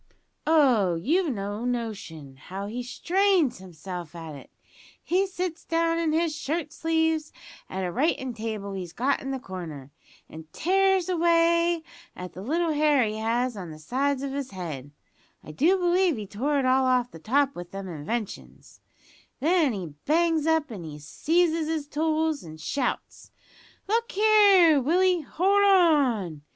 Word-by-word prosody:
Oh, 250 Hz, -, +4 dB
you've 315 Hz, -, +1 dB
no 205 Hz, 0 st, -4 dB
notion 210 Hz, -, -5 dB
how 190 Hz, +8 st, -7 dB
he 230 Hz, +4 st, -4 dB
strains 345 Hz, -, +1 dB
himself 175 Hz, -2 st, -8 dB
at 165 Hz, -2 st, -8 dB
it. 140 Hz, -, -12 dB, 0.5 s
He 375 Hz, +3 st, +1 dB
sits 360 Hz, -3 st, -4 dB
down 330 Hz, 0 st, 0 dB
in 330 Hz, -2 st, 0 dB
his 320 Hz, 0 st, 0 dB
shirt 310 Hz, +1 st, -3 dB
sleeves 320 Hz, -1 st, 0 dB, 0.4 s
at 190 Hz, 0 st, -4 dB
a 175 Hz, -, -3 dB
writin' 265 Hz, -, 0 dB
table 215 Hz, -3 st, -5 dB
he's 180 Hz, -3 st, -6 dB
got 270 Hz, +4 st, 0 dB
in 270 Hz, -, -4 dB
a 265 Hz, -, -3 dB
corner, 160 Hz, -, -8 dB, 0.4 s
an' 160 Hz, 0 st, -11 dB
tears 385 Hz, +1 st, +2 dB
away 335 Hz, -1 st, +2 dB, 0.3 s
at 180 Hz, 0 st, -8 dB
the 185 Hz, -, -8 dB
little 325 Hz, -, 0 dB
hair 295 Hz, -3 st, +3 dB
he 215 Hz, 0 st, -3 dB
has 235 Hz, +2 st, -1 dB
on 185 Hz, -4 st, -7 dB
the 155 Hz, -, -9 dB
sides 270 Hz, -, -1 dB
of 275 Hz, -1 st, -4 dB
his 275 Hz, -2 st, -4 dB
head 155 Hz, -8 st, -6 dB, 0.5 s
(I -, -, -9 dB
do 330 Hz, -, +3 dB
believe 355 Hz, -3 st, +2 dB
he 210 Hz, -, -5 dB
tore 260 Hz, +9 st, -1 dB
it 270 Hz, -, +1 dB
all 260 Hz, +1 st, +3 dB
off 250 Hz, -1 st, +1 dB
the 165 Hz, -, -11 dB
top 275 Hz, -, +1 dB
with 175 Hz, 0 st, -8 dB
them 195 Hz, 0 st, -7 dB
inventions), 185 Hz, +7 st, -6 dB, 0.6 s
then 315 Hz, 0 st, +3 dB
he 180 Hz, -8 st, -6 dB
bangs 325 Hz, 0 st, +2 dB
up 320 Hz, -4 st, +1 dB
an' 165 Hz, -8 st, -7 dB
seizes 320 Hz, -, 0 dB
his 315 Hz, -2 st, -2 dB
tools, 315 Hz, 0 st, 0 dB
and 155 Hz, -1 st, -11 dB
shouts, 255 Hz, -, -3 dB, 0.6 s
`Look 465 Hz, +3 st, 0 dB
here, 400 Hz, -7 st, +6 dB
Willie, 355 Hz, +5 st, +2 dB
hold 390 Hz, +7 st, +2 dB
on!' 280 Hz, -, +3 dB
275 Hz, 155 wpm, -26 LUFS, -, 0.6 s, here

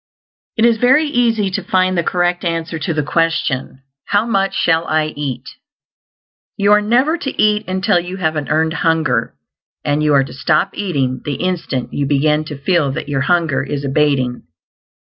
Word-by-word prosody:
It 225 Hz, -, +4 dB
is 235 Hz, -1 st, +4 dB
very 260 Hz, +6 st, +4 dB
easy 230 Hz, -8 st, +1 dB
to 195 Hz, 0 st, -3 dB
find 185 Hz, 0 st, +1 dB
the 170 Hz, -, +2 dB
correct 175 Hz, +1 st, 0 dB
answer 165 Hz, -1 st, -2 dB
to 170 Hz, +3 st, -2 dB
the 150 Hz, -2 st, -1 dB
question, 150 Hz, -4 st, -1 dB, 0.2 s
How 205 Hz, +2 st, +1 dB
much 195 Hz, -4 st, 0 dB
shall 165 Hz, 0 st, +1 dB
I 155 Hz, 0 st, +1 dB
eat? 140 Hz, -4 st, -5 dB, 1.1 s
You 200 Hz, 0 st, +2 dB
are 210 Hz, 0 st, +6 dB
never 255 Hz, +10 st, +2 dB
to 270 Hz, -, -5 dB
eat 210 Hz, 0 st, +2 dB
until 185 Hz, 0 st, +1 dB
you 180 Hz, +2 st, -6 dB
have 160 Hz, -4 st, -1 dB
an 150 Hz, -2 st, -3 dB
earned 160 Hz, 0 st, +1 dB
hunger, 160 Hz, -8 st, 0 dB, 0.5 s
and 145 Hz, +1 st, +1 dB
you 150 Hz, -1 st, +3 dB
are 135 Hz, -, +4 dB
to 135 Hz, -, -9 dB
stop 140 Hz, +7 st, +1 dB
eating 140 Hz, -10 st, -2 dB
the 145 Hz, -, -3 dB
instant 175 Hz, -8 st, -3 dB
you 140 Hz, -1 st, -1 dB
BEGIN 150 Hz, +2 st, +1 dB
to 150 Hz, -2 st, -7 dB
feel 145 Hz, 0 st, +1 dB
that 145 Hz, -, -5 dB
your 135 Hz, -2 st, 0 dB
hunger 165 Hz, -1 st, +1 dB
is 140 Hz, 0 st, -4 dB
abating. 135 Hz, -3 st, +1 dB
165 Hz, 180 wpm, -17 LUFS, 145-195 Hz, 1.1 s, are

